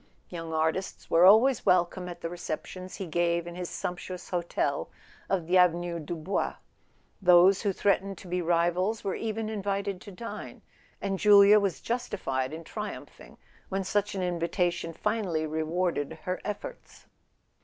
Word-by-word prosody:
Young 165 -2 -6
artists 160 +4 -2
were 170 +2 +6
always 230 +5 +6
welcome 180 0 +2
at 175 - -9
the - - -2
receptions 175 +2 -6
he 195 - -5
gave 170 +1 0
in 175 - -7
his 180 0 -5
sump¬ 180 -2 -4
tuous 180 0 -8
hotel 175 -2 -1 0.4
of 185 -4 0
the 180 +2 +4
Avenue 175 -1 +2
du 160 +2 -5
Bois. 165 +5 -2 0.7
Those 180 +1 +6
who 205 - +1
threat¬ 200 0 +2
ened 195 -1 -7
to 185 - -12
be 180 +1 -1
rivals 175 +5 +1
were 195 -2 -1
even 220 0 -3
invited 200 -2 -2
to 205 - -10
dine; 230 +5 -8 0.4
and 195 -1 -1
Julia 205 0 +7
was 195 -4 -1
justified 165 - -2
in 160 +2 -7
triumphing 210 +5 -8 0.3
when 195 0 -1
such 205 +2 -1
an 190 - -2
invitation 175 0 -1
finally 185 -3 -1
rewarded 160 0 -1
her 185 0 -3
efforts. - - -7
180 Hz, 155 wpm, -28 LUFS, 170-200 Hz, 0.7 s, Julia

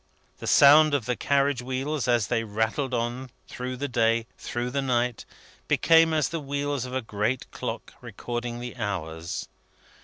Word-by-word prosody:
The - - -6
sound 150 +1 +7
of 130 -6 -1
the 125 - 0
carriage 140 -1 +1
wheels, 130 +2 -2
as 120 -4 +3
they 115 +1 0
rattled 110 +6 -1
on, 120 +2 -2 0.2
through 125 0 -5
the 145 +3 -2
day, 115 -2 +1
through 120 +1 -4
the 140 +2 0
night, 125 -2 0 0.4
became 165 0 +5
as 155 -3 +1
the 165 - -3
wheels 140 -2 -2
of 125 0 -6
a 130 - -1
great 110 +4 -2
clock, - - -5
recording 120 0 -5
the 120 0 -7
hours. 85 -6 -4
125 Hz, 160 wpm, -26 LUFS, 115-140 Hz, 0.4 s, sound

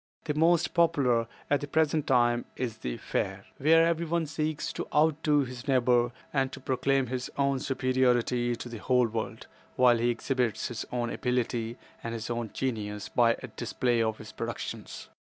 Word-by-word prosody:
The 150 - -1
most 165 +2 +3
popular 130 -9 +3 0.2
at 145 - +2
the 145 - -4
present 155 0 +1
time, 120 -2 +3
is 120 -3 -3
the - - -4
Fair, - - -3
where 165 +3 +5
everyone 170 0 0
seeks 155 +1 -2
to - - -4
outdo 150 -1 +3
his 125 -2 -6
neighbor 125 -2 +3 0.2
and 135 -2 +1
to - - -7
proclaim 135 +1 +1
his 125 +1 -4
own 140 -1 +2
superiority 125 -2 +1
to 120 - -7
the 115 -2 -7
whole 125 +2 +3
world, 110 -1 -4 0.3
while 125 -2 +5
he 120 +1 +2
exhibits 120 -2 -1
his 120 - -5
own 120 -1 -1
abilities 120 -2 -1 0.3
and 115 0 -3
his 115 +1 -4
own 120 -2 -2
genius 105 -5 -3
by 115 -1 +3
a - - -4
display 120 -2 0
of 110 -1 0
his - - -10
productions. - - -6
125 Hz, 170 wpm, -29 LUFS, 120-145 Hz, 0.3 s, where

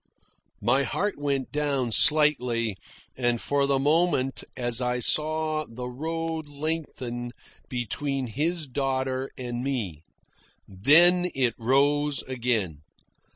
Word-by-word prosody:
My 130 +3 +3
heart 165 - -2
went 140 -2 -2
down 140 -5 -1
slightly 125 -7 +3 0.4
and 120 -2 0
for 140 +2 +1
the 140 -1 +2
moment 145 -2 +1
as 120 0 +1
I 125 0 0
saw 155 +4 0
the 125 +2 -6
road 160 +3 -4
lengthen 140 -5 -4 0.4
between 130 +3 -2
his 155 +8 -2
daughter 130 0 -2
and 120 -1 -4
me; 110 - -3 0.7
then 170 - +5
it 125 -3 +1
rose 140 +4 +2
again. 115 - -2
135 Hz, 110 wpm, -26 LUFS, 120-150 Hz, 0.7 s, then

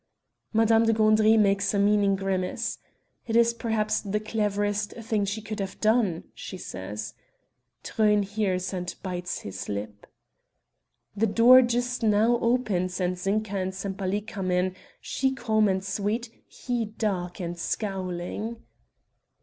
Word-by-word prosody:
Madame 225 0 +4
de 225 - +4
Gandry 215 0 +4
makes 200 -1 +2
a - - +2
meaning 200 0 +3
grimace. 190 -1 -2 0.5
"It 225 - -1
is 235 0 +5
perhaps 220 -2 0
the 210 0 -2
cleverest 205 -1 -1
thing 220 -3 -1
she 205 +2 -4
could 215 -1 -5
have 195 -1 -5
done," 215 -6 +2
she 190 - -8
says. 105 - -6 0.7
Truyn 210 -2 +2
hears 195 -2 -1
and 180 -1 -4
bites 180 -2 -4
his 100 - -7
lip. 105 0 -5 1.1
The 220 +2 +2
door 240 +5 +7
just 245 0 -1
now 225 +2 +3
opens 200 -7 0
and 180 0 0
Zinka 200 +3 -1
and 190 0 -2
Sempaly 195 +1 -2
come 200 -3 -5
in; 180 +1 +1 0.2
she 265 0 -1
calm 220 -3 +2
and 190 -1 0
sweet, 210 +4 -2 0.2
he 245 -2 -3
dark 200 -5 -3
and 175 -1 -4
scowling. 190 +4 -3
205 Hz, 135 wpm, -26 LUFS, 185-220 Hz, 1.1 s, door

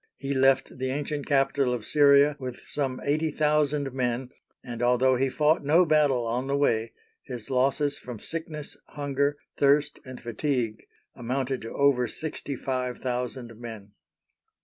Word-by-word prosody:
He 135 +1 -3
left 135 -1 +2
the 130 0 -1
ancient 145 +1 -3
capital 135 -2 +2
of 115 - -7
Syria 145 0 +5
with 125 -2 -6
some 135 -3 -3
eighty 155 +3 +1
thousand 150 -2 +1
men, 125 0 -2 0.3
and, 120 -2 -6
although 125 +2 +3
he 135 +2 +1
fought 150 +4 +2
no 160 +5 +5
battle 145 -6 +3
on 125 +3 -2
the 140 0 +1
way, 115 -5 +1 0.3
his 125 -2 -7
losses 140 +3 +1
from 125 -2 -8
sickness, 155 +3 -6
hunger, 145 0 -1 0.2
thirst, 145 +1 +3
and 130 -1 -9
fatigue 120 -1 -2 0.3
amounted 130 +1 -2
to 115 - -7
over 140 -3 +3
sixty 145 +2 -5
five 125 -1 -3
thousand 125 -1 -4
men. 110 -4 -9
135 Hz, 150 wpm, -27 LUFS, 125-145 Hz, 0.3 s, Syria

